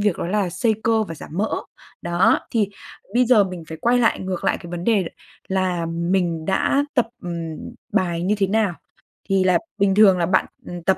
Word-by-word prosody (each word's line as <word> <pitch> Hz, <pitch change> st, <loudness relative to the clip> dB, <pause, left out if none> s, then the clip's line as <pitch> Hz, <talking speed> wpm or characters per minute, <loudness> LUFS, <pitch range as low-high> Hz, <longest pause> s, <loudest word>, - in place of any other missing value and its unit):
việc 205 Hz, -4 st, +1 dB
đó -, -, -2 dB
là 195 Hz, 0 st, 0 dB
xây 220 Hz, +5 st, +1 dB
cơ 225 Hz, -1 st, +3 dB
và 165 Hz, -6 st, -6 dB
giảm 150 Hz, -, -11 dB
mỡ. 205 Hz, +5 st, 0 dB, 0.5 s
Đó, 175 Hz, +2 st, +3 dB
thì 215 Hz, -4 st, +1 dB, 0.5 s
bây 250 Hz, +1 st, +4 dB
giờ 230 Hz, -4 st, +5 dB
mình 180 Hz, -3 st, -7 dB
phải 160 Hz, -, -7 dB
quay 245 Hz, +1 st, +3 dB
lại 230 Hz, -, +2 dB
ngược 185 Hz, -2 st, -4 dB
lại -, -, +2 dB
cái 170 Hz, -, -10 dB
vấn 175 Hz, 0 st, -5 dB
đề 205 Hz, -4 st, +3 dB, 0.4 s
là 185 Hz, -3 st, 0 dB
mình 170 Hz, 0 st, -1 dB
đã 235 Hz, -, +2 dB
tập, 245 Hz, -4 st, +2 dB
ừm, 170 Hz, -3 st, -5 dB, 0.3 s
bài 170 Hz, -2 st, 0 dB
như 195 Hz, +4 st, +1 dB
thế 195 Hz, -, +2 dB
nào? 205 Hz, -2 st, +1 dB, 0.6 s
Thì 195 Hz, -1 st, +3 dB
là 185 Hz, -1 st, +4 dB, 0.2 s
bình 195 Hz, -1 st, +2 dB
thường 200 Hz, -3 st, +6 dB
là 170 Hz, -, +1 dB
bạn, 185 Hz, +3 st, +2 dB, 0.2 s
ừm, 175 Hz, -1 st, -7 dB
tập 190 Hz, +2 st, +2 dB
185 Hz, 210 wpm, -22 LUFS, 175-210 Hz, 0.6 s, thường